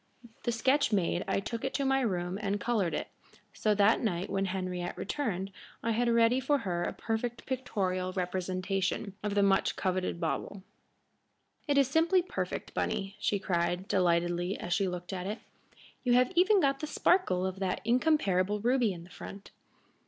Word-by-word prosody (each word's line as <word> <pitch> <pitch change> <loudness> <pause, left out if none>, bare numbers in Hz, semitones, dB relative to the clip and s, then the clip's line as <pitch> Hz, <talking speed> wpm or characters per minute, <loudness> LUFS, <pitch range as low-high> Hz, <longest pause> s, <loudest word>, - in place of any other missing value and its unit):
The 240 - +2
sketch 260 +3 +2
made, 180 -3 +1
I - - +1
took 230 +3 -5
it 265 - -2
to 280 - 0
my 270 0 +3
room 185 -4 -1
and 205 0 -1
colored 210 -8 0
it, - - -3 0.4
so 215 -1 +1
that 205 +2 +5
that - - -7
night, 190 -4 -1
when 195 0 0
Henriette 185 -2 -3
returned, 200 -10 -2 0.3
I 230 - +1
had 235 +2 +1
ready 235 +2 +4
for 285 +3 +2
her 180 -8 -2
a - - -1
perfect 230 +1 -3
pictorial 190 -8 -2
representation 185 +2 -2
of 210 -1 -2
the 200 - +4
much 195 -1 +3
coveted 185 -2 -1
bauble. 185 +4 -3 1.0
"It 285 -1 +2
is 275 -2 +5
simply 330 +6 +3
perfect, 365 - -4
Bunny," 195 +1 -2
she 205 - +1
cried, 180 0 -1
delightedly, 175 0 +1
as 175 - -2
she 200 -1 +1
looked 180 +1 -5
at 185 0 -4
it. 210 +3 -3 0.7
"You 245 - +3
have 250 +1 +4
even 380 +4 +5
got 275 -4 +2
the 305 - -4
sparkle 295 - +2
of 190 0 -3
that 190 -2 -1
incomparable 210 - +2
ruby 240 -1 +2
in 170 -1 -9
the 175 - -16
front." 195 0 -10
200 Hz, 175 wpm, -30 LUFS, 185-245 Hz, 1.0 s, that